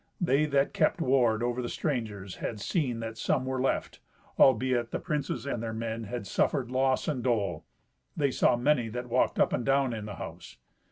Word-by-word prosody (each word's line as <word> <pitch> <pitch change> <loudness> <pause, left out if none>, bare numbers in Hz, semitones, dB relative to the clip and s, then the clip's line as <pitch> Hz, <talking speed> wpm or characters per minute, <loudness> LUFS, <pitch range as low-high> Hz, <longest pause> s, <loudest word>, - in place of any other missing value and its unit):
They 155 -3 +2
that 140 -1 +1
kept - - +2
ward 120 -4 +2
over 120 +1 -1
the 120 - -4
strangers 110 - -3
had 110 - -4
seen 125 - -1
that 115 0 -6
some 130 +2 +1
were 130 0 -2
left, 135 - -1 0.4
albeit 130 -3 +4
the - - -2
princes 145 -2 -3
and 130 -5 -2
their 115 -1 -3
men 115 0 -3
had 115 +1 -5
suffered 125 +4 0
loss 130 0 +1
and 130 -6 -1
dole. 100 -10 0 0.5
They 140 -2 +2
saw - - +3
many 125 -1 +2
that 125 +2 -5
walked - - +2
up - - +3
and 125 - 0
down 135 -1 +2
in 110 -2 -5
the 105 - -6
house. 85 +1 -9
125 Hz, 190 wpm, -29 LUFS, 115-135 Hz, 0.5 s, albeit